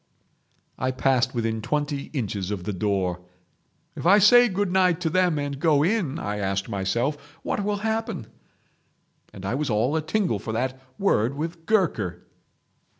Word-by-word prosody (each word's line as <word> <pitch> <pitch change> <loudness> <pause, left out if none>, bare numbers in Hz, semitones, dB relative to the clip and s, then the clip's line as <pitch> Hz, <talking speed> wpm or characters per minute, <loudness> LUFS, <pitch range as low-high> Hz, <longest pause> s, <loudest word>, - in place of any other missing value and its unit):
"I 130 - 0
passed 130 -1 +1
within 115 -1 -1
twenty 145 +2 -2
inches 100 - -3
of 100 -4 -3
the 105 +2 -3
door. 95 -2 -1 0.7
'If - - -6
I 200 +3 +7
say 245 +4 +7
good 195 -1 -1
night 180 -2 +3
to 165 -3 0
them, 180 -3 +2
and 145 -1 -3
go 150 -2 +3
in,' 175 -6 0
I 105 0 -3
asked 95 0 -1
myself, 130 +10 -2
'what 205 - -1
will 205 0 0
happen?' 220 - -2 1.1
And 95 - -9
I 100 - -1
was 145 +2 -1
all 115 +7 +1
a 160 - +1
tingle 160 - 0
for 110 +2 -5
that 130 +3 -2 0.2
word 135 - +1
with 165 +2 -5
Gurker. 110 - 0
140 Hz, 160 wpm, -25 LUFS, 110-180 Hz, 1.1 s, I